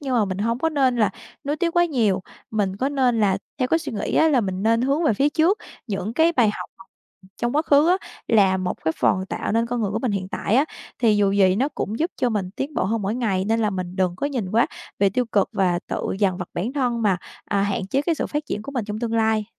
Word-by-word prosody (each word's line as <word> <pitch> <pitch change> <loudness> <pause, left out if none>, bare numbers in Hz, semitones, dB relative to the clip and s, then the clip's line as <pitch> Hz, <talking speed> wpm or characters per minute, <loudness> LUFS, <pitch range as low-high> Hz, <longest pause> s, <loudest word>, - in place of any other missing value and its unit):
nhưng 270 -3 -2
mà 225 -4 +3
mình 190 -1 -4
hông 230 +3 0
có 325 - +1
nên 265 -5 +2
là 215 -3 +3 0.3
nuối 290 +2 -1
tiếc 345 0 -1
quá 345 - +6
nhiều. 220 - +1 0.3
Mình 200 -3 -1
có 260 +6 0
nên 255 -5 +1
là 195 -2 +2 0.2
theo 255 -1 +1
cái 325 - +3
suy 330 - -6
nghĩ 210 - -3
á 320 - +5
là 275 -5 +3
mình 190 -2 -3
nên 230 +2 +3
hướng 280 +5 +1
về 290 - +4
phía 275 +7 +3
trước. 335 +7 +2 0.3
Những 200 0 -3
cái 325 +5 +3
bài 235 -8 +3
học - - -7
học 190 - -15 0.5
trong 240 +4 -1
quá 310 - +3
khứ 295 +1 +4
á, 365 - +5 0.3
là 195 -4 +4
một 185 -1 -2
cái 160 - +2
phần 190 +1 +2
tạo - - -3
nên 230 +1 +2
con 240 0 -2
người 200 - 0
của 220 - -1
mình 235 -3 -1
hiện 185 -2 -3
tại 215 +4 0
á. 275 - +5 0.3
Thì 225 -4 +3
dù 200 -1 +3
gì 190 -1 +4
nó 270 +5 +1
cũng 220 -6 -4
giúp 335 +3 0
cho 250 - +1
mình 200 -4 -2
tiến 280 +1 -4
bộ 185 - 0
hơn 220 +2 -1
mỗi 200 +3 -1
ngày, 200 -6 0
nên 225 +2 +1
là 215 -2 +1
mình 185 -1 -5
đừng 180 -2 0
có 280 - -1
nhìn 245 -10 -3
quá 230 +3 +3 0.3
về 200 -1 +3
tiêu 250 +5 0
cực 200 -2 +3
và 180 -3 +1
tự - - -3
dằn 190 -3 +1
vặt 180 - -5
bản 210 +9 -2
thân 245 -5 0
mà, 200 -4 +3 0.3
à, 200 -1 0
hạn 200 -1 -1
chế 270 +7 0
cái 330 +2 +1
sự - - -2
phát 295 0 -3
triển 210 - -3
của 280 - -8
mình 245 -6 -2
trong 210 0 -5
tương 230 -1 -3
lai. 220 -1 +2
225 Hz, 280 wpm, -23 LUFS, 195-270 Hz, 0.5 s, quá